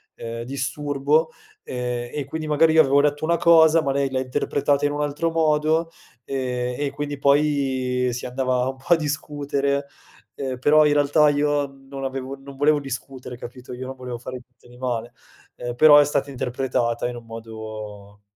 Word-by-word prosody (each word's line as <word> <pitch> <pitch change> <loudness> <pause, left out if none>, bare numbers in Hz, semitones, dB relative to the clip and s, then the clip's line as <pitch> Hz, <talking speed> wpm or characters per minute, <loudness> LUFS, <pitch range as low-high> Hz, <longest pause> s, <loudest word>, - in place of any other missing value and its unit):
ehm, 115 0 -6
disturbo, 140 +4 0 0.3
ehm, 125 -1 -4
e 145 -2 -3
quindi 155 +3 -5
magari 160 +1 +4
io 160 - +7
avevo 140 0 +4
detto 145 0 0
una 170 +1 +2
cosa 165 -1 +6
ma 140 - -1
lei 140 0 0
l'ha 130 - 0
interpretata 140 +2 0
in 145 - +1
un 145 0 -2
altro 150 +3 -1
modo, 160 0 +2 0.4
ehm, 125 -2 -2
e 145 -1 -1
quindi 145 -1 -4
poi 135 -3 +1
si 120 +1 -5
andava 130 0 0
un 135 - -6
po' 135 - -21
a - - +7
discutere, 145 -2 -2 0.5
ehm, 130 -2 -4
però 150 +4 +5
in 145 - +3
realtà 145 +1 +4
io 145 0 +1
non 135 0 -10
avevo 135 0 -4
non 135 0 -12
volevo 150 +1 +3
discutere, 130 -2 -7
capito? 125 +1 -10
Io 125 +1 -6
non 130 +1 -6
volevo 125 -2 -6
fare 125 +1 -7
niente 125 -1 -25
di 120 0 -16
male, 120 -2 -3 0.4
ehm, 120 0 -5
però 150 +2 +8
è 145 - +5
stata 140 -1 -1
interpretata 125 -2 -1
in 120 0 -5
un 120 - -11
modo 110 -3 -9
135 Hz, 180 wpm, -23 LUFS, 125-145 Hz, 0.5 s, però